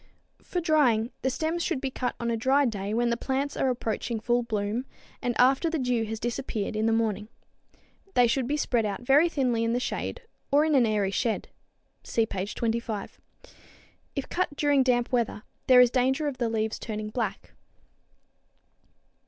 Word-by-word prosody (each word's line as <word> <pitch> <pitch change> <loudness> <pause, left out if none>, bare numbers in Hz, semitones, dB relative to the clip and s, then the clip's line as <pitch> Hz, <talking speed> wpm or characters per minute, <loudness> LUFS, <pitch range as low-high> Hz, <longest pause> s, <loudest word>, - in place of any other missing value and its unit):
For 360 - -3
drying, 270 -9 +2
the 265 - +1
stems 320 +6 -2
should 275 - -1
be 265 0 -3
cut 255 -1 -2
on 235 0 -1
a - - +1
dry 265 +5 +3
day 205 -4 -2
when 235 +2 +1
the - - +2
plants 275 +3 -2
are 265 - +1
approaching 230 -1 -2
full 240 +2 +1
bloom 220 +2 -2 0.3
and 245 -1 -2
after 270 +6 +4
the 325 - -1
dew 250 -4 0
has 220 0 -5
disappeared 235 -3 -3
in 215 +1 +1
the - - +3
morning. 215 -2 0 0.9
They 245 - +6
should 240 +1 0
be 295 +3 0
spread 240 -5 +1
out 205 +2 -3
very 290 +7 +5
thinly 250 -7 0
in 230 0 +1
the 245 - +1
shade 485 - -4 0.3
or 290 +2 +5
in 315 - +1
an 255 -5 +5
airy 205 -3 +1
shed. 225 +2 -1 0.5
(See 230 - +1
page 195 -1 -4
25.) 225 -3 -3 0.9
If 275 - -3
cut 355 -5 -1
during 290 -1 +3
damp 245 -2 +1
weather, 235 -4 0 0.2
there 255 -1 +8
is 245 -1 +5
danger 265 +4 +1
of 275 -3 -4
the 235 -2 +1
leaves 220 -1 -1
turning 215 -1 -5
black. 230 -1 -4
240 Hz, 180 wpm, -27 LUFS, 225-270 Hz, 0.9 s, there